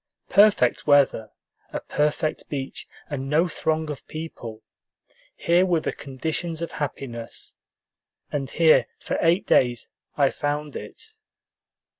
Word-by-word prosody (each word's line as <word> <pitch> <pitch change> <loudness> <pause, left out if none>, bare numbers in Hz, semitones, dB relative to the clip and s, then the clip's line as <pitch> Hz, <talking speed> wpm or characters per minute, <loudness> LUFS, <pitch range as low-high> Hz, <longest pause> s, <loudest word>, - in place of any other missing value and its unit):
Perfect 200 - +4
weather, 140 -6 +4 0.4
a - - -3
perfect 150 +1 -1
beach, 135 -2 -5 0.2
and 135 -2 -4
no 160 +5 +3
throng 160 -1 -1
of 145 - -9
people: 120 -9 -7 0.7
here 170 +2 +3
were 175 -3 +2
the - - -3
conditions 160 +5 -3
of 170 - -4
happiness; 120 -6 -5 0.8
and 135 -2 -2
here 160 -1 +5
for - - -3
eight 170 +4 +3
days 120 -2 +2 0.3
I 140 -2 +4
found 145 0 -3
it. 440 - -8
150 Hz, 120 wpm, -24 LUFS, 135-165 Hz, 0.8 s, here